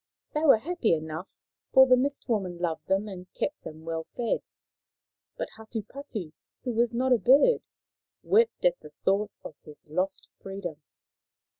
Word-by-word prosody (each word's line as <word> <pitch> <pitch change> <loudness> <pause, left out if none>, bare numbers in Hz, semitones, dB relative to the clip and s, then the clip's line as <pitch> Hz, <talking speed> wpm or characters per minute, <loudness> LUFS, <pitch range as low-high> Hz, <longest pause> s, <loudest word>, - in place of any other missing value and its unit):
They 300 - +1
were 295 -7 +7
happy 265 - +1
enough, 160 +3 -5 0.5
for 265 - +9
the 255 -1 +6
Mist 275 +3 -1
woman 195 -7 -1
loved 170 -2 -2
them 195 +2 +1
and 185 -2 -9
kept 295 +1 -2
them 155 +1 -10
well 165 -1 -3
fed. 235 -2 0 1.0
But - - -3
Hatupatu, 220 - -6 0.3
who 250 - -1
was 235 0 +2
not 255 +2 +2
a 240 - +4
bird, 280 - +5 0.6
wept 460 +2 +3
at - - +4
the - - -12 0.2
thought 200 +2 +3
of - - -8
his 150 0 -11
lost 185 +4 -1
freedom. 185 -5 -6
215 Hz, 155 wpm, -28 LUFS, 175-260 Hz, 1.0 s, for